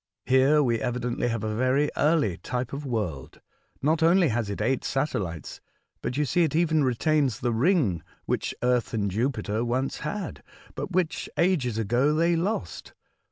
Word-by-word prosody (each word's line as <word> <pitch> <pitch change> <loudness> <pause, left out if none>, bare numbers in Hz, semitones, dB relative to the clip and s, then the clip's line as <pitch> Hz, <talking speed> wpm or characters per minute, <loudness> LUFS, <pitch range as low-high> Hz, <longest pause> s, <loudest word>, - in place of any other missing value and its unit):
Here 135 +4 +4
we 120 -3 +1
evidently 120 0 -1
have 115 -3 -2
a 110 0 -2
very 130 +5 +2
early 150 - +2
type 125 0 -4
of 140 0 -5
world. 90 - -3 0.4
Not 155 +3 +2
only 170 0 +5
has 115 -3 -1
it 100 - -4
eight 120 +5 0
satellites, 100 - -3 0.4
but 125 - -3
you 150 - +2
see 175 +6 +1
it 155 -3 +1
even 160 -2 +3
retains 130 -1 +1
the 120 -1 0
ring 120 - +2 0.2
which - - -2
Earth 125 -2 +1
and 100 -3 0
Jupiter 110 -1 -1
once 130 +3 -1
had, 175 +4 -5 0.3
but - - -5
which 180 -2 -1
ages 150 - +1
ago 120 +7 +2
they 170 +2 +3
lost. 170 - -3
130 Hz, 160 wpm, -26 LUFS, 115-155 Hz, 0.4 s, only